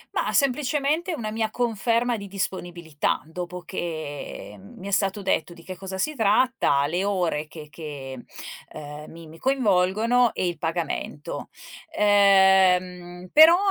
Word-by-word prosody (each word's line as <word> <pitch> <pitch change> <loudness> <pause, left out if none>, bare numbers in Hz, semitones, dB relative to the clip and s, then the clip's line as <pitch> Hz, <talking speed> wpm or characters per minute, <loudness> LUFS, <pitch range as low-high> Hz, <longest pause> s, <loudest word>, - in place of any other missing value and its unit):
Mah, - - 0
semplicemente 295 +5 +1
una 215 -6 -4
mia 220 0 -1
conferma 235 +1 0
di 200 - -8
disponibilità, 175 -5 -3
dopo 175 +2 -6
che 155 - -6
mi 185 - -11
è - - -5
stato 195 0 0
detto 175 -1 0
di 170 - -15
che 185 +2 -7
cosa 190 +1 -7
si 305 +11 -1
tratta, 220 - +2
le 175 +6 -1
ore 175 -6 -1
che 155 -1 -11
che, 140 -4 -8 0.5
ehm, 150 +1 -9
mi 165 0 -11
mi 160 +1 -14
coinvolgono, 230 -1 +2
e - - -1
il 170 -3 -4
pagamento. 160 -3 -4 0.5
Ehm, 190 -3 +4
però 320 +3 +9
185 Hz, 135 wpm, -24 LUFS, 165-220 Hz, 0.5 s, però